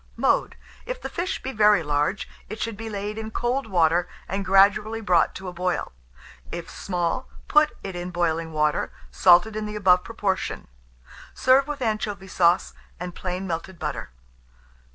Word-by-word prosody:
Mode. -, -, +1 dB, 0.3 s
If -, -, -4 dB
the -, -, -6 dB
fish 360 Hz, +2 st, -3 dB
be 265 Hz, -, -3 dB
very 210 Hz, -6 st, +4 dB
large, 150 Hz, +6 st, 0 dB, 0.2 s
it 215 Hz, +2 st, -6 dB
should 230 Hz, -2 st, -3 dB
be 225 Hz, +2 st, -6 dB
laid 210 Hz, +1 st, -4 dB
in 220 Hz, 0 st, -5 dB
cold 240 Hz, +3 st, -1 dB
water, 175 Hz, -3 st, +2 dB, 0.2 s
and 195 Hz, +1 st, -2 dB
gradually 200 Hz, +3 st, +4 dB
brought 180 Hz, -6 st, +2 dB
to 190 Hz, -, -7 dB
a 180 Hz, -, -5 dB
boil; 180 Hz, +1 st, -2 dB, 0.6 s
if 175 Hz, -, -6 dB
small, 175 Hz, -3 st, -2 dB, 0.2 s
put 300 Hz, 0 st, +4 dB
it 195 Hz, -2 st, -5 dB
in 175 Hz, 0 st, -4 dB
boiling 165 Hz, -2 st, -1 dB
water, 150 Hz, -1 st, 0 dB, 0.2 s
salted 180 Hz, +4 st, +5 dB
in 215 Hz, 0 st, -3 dB
the 210 Hz, -, -6 dB
above 180 Hz, -3 st, +4 dB
proportion. 200 Hz, -4 st, -2 dB, 0.7 s
Serve 265 Hz, +2 st, +4 dB
with 290 Hz, -3 st, -4 dB
anchovy 210 Hz, -4 st, -2 dB
sauce 175 Hz, 0 st, +3 dB, 0.3 s
and 180 Hz, 0 st, -5 dB
plain 185 Hz, +1 st, -4 dB
melted 170 Hz, +1 st, -4 dB
butter. -, -, -4 dB
195 Hz, 160 wpm, -24 LUFS, 175-220 Hz, 0.7 s, salted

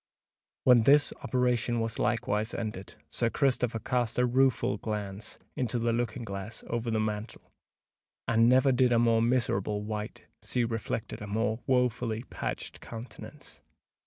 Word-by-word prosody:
When 125 Hz, -2 st, +7 dB
this 145 Hz, +5 st, +5 dB
operation 125 Hz, -2 st, +1 dB
was 115 Hz, -1 st, -2 dB
likewise 110 Hz, -1 st, 0 dB
ended, 105 Hz, -4 st, -5 dB, 0.2 s
Sir 115 Hz, -, 0 dB
Christopher 125 Hz, -3 st, +1 dB
cast 120 Hz, 0 st, -1 dB
a 125 Hz, -, +4 dB
rueful 125 Hz, -4 st, +2 dB
glance 105 Hz, -1 st, -5 dB, 0.2 s
into 125 Hz, -1 st, -1 dB
the 115 Hz, 0 st, +1 dB
looking 120 Hz, +1 st, -2 dB
glass 100 Hz, +1 st, -6 dB
over 120 Hz, 0 st, -2 dB
the 110 Hz, -1 st, +1 dB
mantel; 110 Hz, +1 st, -4 dB, 0.8 s
and 115 Hz, 0 st, +4 dB
never 130 Hz, +2 st, +5 dB
did 125 Hz, -1 st, +3 dB
a 120 Hz, -, +4 dB
more 115 Hz, -1 st, +4 dB
miserable 105 Hz, -4 st, +1 dB
wight 105 Hz, 0 st, -5 dB, 0.2 s
see 125 Hz, -, 0 dB
reflected 115 Hz, -1 st, -3 dB
a 105 Hz, -, -6 dB
more 110 Hz, +2 st, 0 dB
woefully 125 Hz, -3 st, +1 dB
patched -, -, -4 dB
countenance. 115 Hz, +2 st, -9 dB
115 Hz, 140 wpm, -29 LUFS, 110-125 Hz, 0.8 s, When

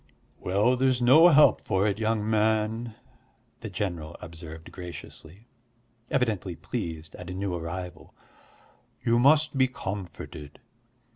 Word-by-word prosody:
"Well, 105 Hz, +7 st, +2 dB
there's 130 Hz, -1 st, +2 dB
no 135 Hz, +8 st, +7 dB
help 150 Hz, -3 st, +6 dB
for 95 Hz, +1 st, 0 dB
it, 105 Hz, 0 st, 0 dB
young 110 Hz, -1 st, 0 dB
man," 110 Hz, +1 st, 0 dB, 0.6 s
the 110 Hz, -, -6 dB
general 85 Hz, -5 st, -4 dB
observed 80 Hz, -1 st, -10 dB
graciously, 90 Hz, +2 st, -10 dB, 0.6 s
evidently 110 Hz, -, -1 dB
pleased 80 Hz, -1 st, -5 dB
at 90 Hz, 0 st, -9 dB
a 90 Hz, -, -5 dB
new 95 Hz, -1 st, -2 dB
arrival. 85 Hz, +1 st, -6 dB, 0.9 s
"You 115 Hz, 0 st, +3 dB
must 150 Hz, +4 st, +4 dB
be 130 Hz, -1 st, +4 dB
comforted. 90 Hz, -, -7 dB
105 Hz, 120 wpm, -27 LUFS, 90-120 Hz, 0.9 s, no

